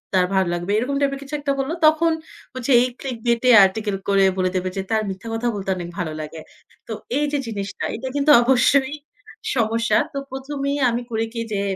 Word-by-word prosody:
তার 185 -1 +4
ভাল 190 -1 +3
লাগবে। 175 +3 -3
এরকম 255 +5 -1
টাইপ 280 -1 +2
এর - - -9
কিছু 280 +2 -6
একটা 285 -1 -1
বললো। 270 +4 -1
তখন 320 +2 +3 0.4
হচ্ছে 255 +1 -3
এই 245 - +3 0.2
ClickBit 235 -3 -1
এ - - +8
আর্টিকেল 205 +1 -2
করে 195 -1 +4
বলে 185 -1 +1
দেবে 185 0 -1
যে, - - 0
তার 220 -1 +2
মিথ্যা 190 +4 -7
কথা 225 +2 -1
বলতে 195 -1 -5
অনেক 175 -1 -6
ভালো 170 -3 -2
লাগে। 155 +1 -8 0.5
তো 225 - -4 0.2
এই 295 - +1
যে 295 - 0
জিনিসটা 200 -2 -4
এটা 230 +4 -6
কিন্তু 285 +1 +3
অবশ্যই 265 +2 +3 0.6
সমস্যা। 230 -2 +1 0.2
তো - - -4
প্রথমেই 275 +1 -3
আমি 235 +1 -2
করি 225 0 0
কি 230 - -3
যে, 200 - 0
230 Hz, 205 wpm, -22 LUFS, 195-275 Hz, 0.6 s, এ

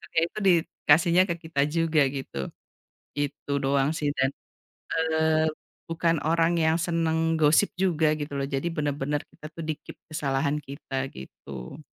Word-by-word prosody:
ya, 160 - +6
itu - - -13
dikasihnya 170 0 +4
ke 170 - 0
kita 160 -3 -1
juga, 165 0 +2
gitu. 135 - -6 0.8
Itu 145 0 -4
doang 135 +1 +2
sih 145 -2 0
dan, 130 +1 +3 0.6
eee, 160 -1 +2 0.4
bukan 165 -1 +1
orang 165 +1 +3
yang 160 0 +3
senang 165 -1 +1
gosip 155 +6 +4
juga, 165 -5 +2
gitu 145 -1 -5
loh. 140 - -1
Jadi 140 +4 -1
benar-benar 145 -1 -1
kita 155 - -11
tuh 165 - -6
di-keep 155 -1 -5 0.2
kesalahan 145 -1 0
kita, 135 -2 -5
gitu. 65 - -9
155 Hz, 140 wpm, -26 LUFS, 140-165 Hz, 0.8 s, ya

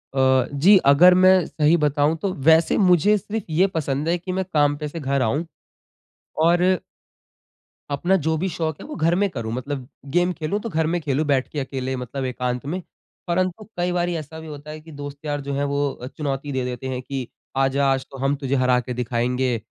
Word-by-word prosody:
अ, 130 -1 +3
जी 180 +9 +6
अगर 180 +6 +7
मैं 185 -1 +5
सही 155 +1 +2
बताऊँ 150 0 +2
तो, 195 -2 -1
वैसे 160 +3 +4
मुझे 190 +2 +4
सिर्फ़ 210 +2 -4
ये 180 +5 +4
पसंद 145 -1 -1
है 175 - +2
कि 180 +2 -6
मैं 190 +1 -1
काम 145 -1 +3
पे 150 0 -4
से 165 +3 -6
घर 140 -2 0
आऊँ 140 +8 0 1.0
और 175 +1 +4 1.3
अपना 175 +7 +1
जो 160 0 +2
भी 185 +5 -1
शौक 160 -2 -3
है - - -9
वो 305 - -7
घर 165 +1 +2
में 200 +2 +1
करूँ। 115 -9 -5
मतलब 130 +1 -4 0.3
गेम 175 +1 +3
खेलूँ 170 +5 -2
तो 230 - -5
घर 160 -4 0
में 175 +2 0
खेलूँ 150 0 0
बैठ 135 -3 +1
के 150 - -3
अकेले 130 -1 -3
मतलब 130 +2 -4
एकांत 125 0 -3
में। 175 +6 -3 0.5
परंतु 185 +3 -1
कई 175 0 0
बारी 175 0 0
ऐसा 160 0 -7
भी 160 - -10
होता 150 0 -9
है 155 - -8
कि 160 +1 -14
दोस्त-यार 145 0 -5
जो 140 0 -4
हैं 140 +1 -1
वो 140 -3 -2
चुनौती 145 -1 -3
दे 130 -2 -1
देते 125 +1 -5
हैं 130 -1 -3
कि 130 -1 -5 0.3
आजा 135 +1 +2
आज 135 -1 -1
तो 135 - -9
हम 135 +2 0
तुझे 140 -1 -2
हरा 125 -1 +3
के 125 +1 -5
दिखाएँगे। 125 0 -1
145 Hz, 205 wpm, -22 LUFS, 135-170 Hz, 1.3 s, अगर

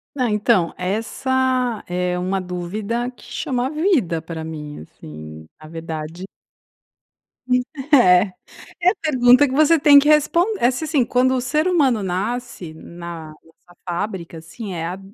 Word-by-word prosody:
Ah, 250 -5 0
então, 210 -4 +2
essa 250 +4 -1
é 180 0 -1
uma 185 +2 -1
dúvida 200 +7 -4
que - - -20
chama 255 0 -3
vida 300 - 0
pra 160 0 -7
mim, 150 -2 -7
assim, 80 0 -11 0.2
na 155 - -11
verdade. 165 +2 -7 1.7
É, 180 -9 +7 0.6
é 355 - +5
a 390 - -1
pergunta 260 -2 +5
que 260 - -5
você 310 +3 +4
tem 285 0 +8
que 295 - 0
respon 305 +4 +4
é 240 - +4
se 255 +5 -5
assim, 295 -6 +1
quando 255 +2 +2
o 255 - -1
ser 305 +7 0
humano 270 - +2
nasce 190 -1 -4
na 170 -1 -9
nossa 165 +3 -22
fábrica, 175 -1 -4
assim, 195 +5 -8
é 165 -1 -4
a, 180 +3 -6
210 Hz, 145 wpm, -20 LUFS, 170-260 Hz, 1.7 s, tem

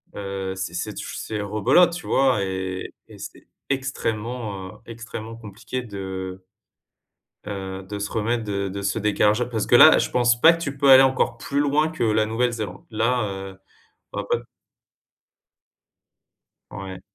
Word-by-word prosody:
heu, 95 -1 -4
c'est 90 -3 -4
c'est 90 - -4
tou - - -6
c'est 110 -1 -4
rebelote, 110 - +3
tu 175 - -7
vois, 130 -6 +3
et 95 -1 -4 0.2
et - - -14
c'est - - -10 0.2
extrêmement, 115 -6 -3
heu, - - -10 0.2
extrêmement 115 -1 -8
compliqué 115 +3 -6
de, 100 -4 -9 0.4
heu - - -39 1.0
heu, 95 -1 -5
de 100 +2 -6
se 105 - -4
remettre 115 +1 -1
de 100 -2 -2
de 100 +1 -5
ce 100 +3 -1
décalage-là. 105 +3 +2
Parce 115 -4 -2
que - - +4
là, 155 +6 +9
je - - 0
pense 120 -1 +2
pas 165 - +9
que 165 - -6
tu 140 -3 -4
peux 140 -1 +3
aller 135 0 +10
encore 130 -3 +1
plus 140 +4 -2
loin 150 +2 +2
que 160 -6 -3
la 110 -1 +2
Nouvelle-Zélande. 110 -4 -2
Là, 115 +3 +1
heu, 95 0 -7 0.5
bah, 100 0 -4
pas - - +3
t 120 - -14 2.3
Ouais. 95 -2 -8
110 Hz, 165 wpm, -23 LUFS, 100-125 Hz, 2.3 s, aller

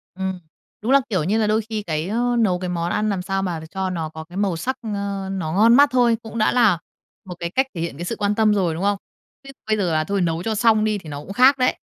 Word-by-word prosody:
Ừm, 190 -1 -3 0.4
đúng 225 +5 -1
là, 275 0 +6
kiểu 185 -8 0
như 200 +7 +1
là, 220 -1 +1
đôi 215 +1 +2
khi 215 -2 -3
cái, 155 -2 -2
ơ, 240 +3 0
nấu 185 -6 +2
cái 180 0 -4
món 170 0 -2
ăn 215 0 0
làm 195 -3 -1
sao 195 +1 -2
mà 175 -4 -3
cho 190 -1 -2
nó 165 -3 -3
có 160 0 -8
cái 175 +3 -11
màu 200 -3 0
sắc, 260 +11 -3
ờ, 200 -2 -3
nó 170 -5 -3
ngon 225 +5 +5
mắt 285 +2 +6
thôi, 240 -2 +3
cũng 225 0 -8
đã 215 - +3
là 220 -8 +4 0.5
một 180 -2 -7
cái 170 - -3
cách 265 - +3
thể 170 - -5
hiện 165 -5 -4
cái 175 - -5
sự - - -3
quan 205 0 0
tâm 215 -1 +3
rồi, 185 -5 +1
đúng 165 +4 -4
không? 200 0 +2 0.5
Chứ 275 - -12 0.2
bây 215 0 +2
giờ 180 -5 0
là, 155 0 +2
thôi 200 +4 -1
nấu 165 -1 -1
cho 220 +1 -1
xong 220 0 +3
đi, 215 -1 +1
thì 170 -6 -10
nó 145 -1 -5
cũng 195 - -8
khác 260 +5 +5
đấy. 255 -1 +1
200 Hz, 285 wpm, -22 LUFS, 175-220 Hz, 0.5 s, là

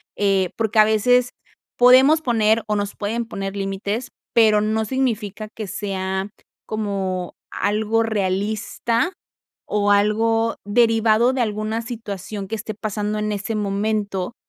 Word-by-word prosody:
eh, 195 -2 +2
porque 220 -1 +1
a - - +9
veces 245 +3 +3 0.5
podemos 260 +6 +6
poner 225 -4 +2
o 210 - 0
nos 205 -1 -2
pueden 225 +3 -2
poner 195 -3 -5
límites, 200 +5 -3 0.2
pero 215 -2 +5
no 220 +1 0
significa 215 -4 -2
que 215 - -5
sea 190 -1 -3 0.4
como 195 -4 -3 0.2
algo 215 +2 0
realista 220 - -1 0.5
o 205 -1 +1
algo 225 +3 +2
derivado 225 +2 +3
de 260 - 0
alguna 215 0 -2
situación 210 -4 -6
que 225 - -3
esté 215 0 -6
pasando 210 0 -3
en 210 0 -1
ese 210 +2 -3
momento, 205 0 -2
215 Hz, 130 wpm, -21 LUFS, 205-225 Hz, 0.5 s, a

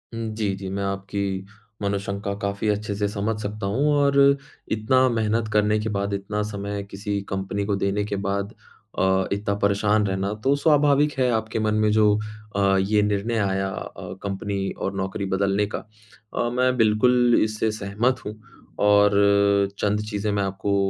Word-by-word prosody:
हुँ। 115 -1 -3
जी, 105 -3 -1
जी। 95 0 -6
मैं 100 +1 -3
आपकी 100 0 -3 0.4
मनोशंका 100 0 -2
काफ़ी 100 +1 -2
अच्छे 105 0 -1
से 105 0 0
समझ 105 +1 -2
सकता 105 0 -4
हूँ 140 +9 +1
और 140 -1 +3
अ, 140 0 +6 0.4
इतना 130 +4 +3
मेहनत 110 -1 0
करने 105 0 +3
के 110 +1 -2
बाद, 100 -1 -2
इतना 100 +1 -2
समय 100 0 -4
किसी 100 +1 -3
कंपनी 95 +1 -2
को 100 - 0
देने 100 +1 0
के 100 - -3
बाद 100 +2 -2 0.5
अ, 95 0 +2
इतना 100 0 -1
परेशान 105 +1 +2
रहना 95 +1 -1
तो 135 +1 +3
स्वाभाविक 145 -1 +3
है। 130 -1 +3
आपके 110 0 -1
मन 110 0 +1
में 105 - +3
जो 105 -1 +4 0.4
अ, 100 -1 +3
ये 105 +2 +2
निर्णय 105 +3 0
आया 95 -1 0
अ, 95 - -7
कंपनी 100 0 -3
और 100 - -3
नौकरी 95 +1 -3
बदलने 100 +1 +1
का, - - -2 0.5
अ, 120 - 0
मैं 125 0 +2
बिल्कुल 120 +2 +4
इससे 110 0 -1
सहमत 110 +4 -1
हूँ 105 - -5 0.5
और 105 0 +5 0.5
अ, - - -23
चंद 105 0 +1
चीज़ें 105 0 -2
मैं 100 -1 0
आपको 95 +1 -1
105 Hz, 170 wpm, -24 LUFS, 100-110 Hz, 0.5 s, अ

